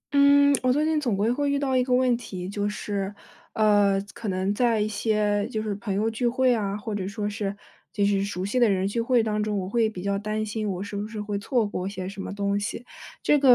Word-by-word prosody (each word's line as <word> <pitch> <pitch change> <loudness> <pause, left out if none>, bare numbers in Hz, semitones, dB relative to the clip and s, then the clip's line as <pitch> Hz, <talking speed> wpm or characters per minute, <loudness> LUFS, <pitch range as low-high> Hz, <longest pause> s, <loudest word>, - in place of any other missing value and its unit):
嗯， 285 0 +6
我 255 - +3
最 295 +4 +2
近 315 -1 +1
总 235 -8 0
归 215 +4 +2
会 285 +3 0
遇 280 - +1
到 275 -2 0
一 255 - +4
个 250 - -4
问 250 -1 +3
题， 190 -6 -6
就 205 +1 -2
是， 200 -1 -3 0.4
呃， 205 -2 +4
可 230 - -7
能 190 +1 0
在 230 0 +2
一 210 - +1
些 210 -1 0
就 220 -3 -2
是 215 -1 -2
朋 200 -1 -4
友 210 +3 +1
聚 225 +2 0
会 255 +1 +3
啊， 205 -3 -1
或 210 0 -5
者 190 -2 -2
说 205 +1 -3
是， 205 -1 -3 0.3
就 205 - +1
是 200 -1 +2
熟 190 -2 -3
悉 230 +6 0
的 240 -3 +5
人 190 -1 +1
聚 230 +4 -1
会 240 -1 +3
当 215 -1 -1
中， 210 -1 -1
我 185 -1 -2
会 225 +2 +2
比 185 -4 -8
较 200 0 0
担 215 +1 -2
心 215 0 -3
我 185 0 -3
是 205 0 -7
不 205 +1 -3
是 220 -1 -7
会 210 -1 -3
错 230 +2 +1
过 190 -2 -3
些 185 -2 -5
什 195 0 -6
么 - - -5
东 200 0 -1
西。 225 +3 -4 0.4
这 295 - +4
个 265 -3 +7
210 Hz, 275 characters per minute, -25 LUFS, 200-240 Hz, 0.4 s, 个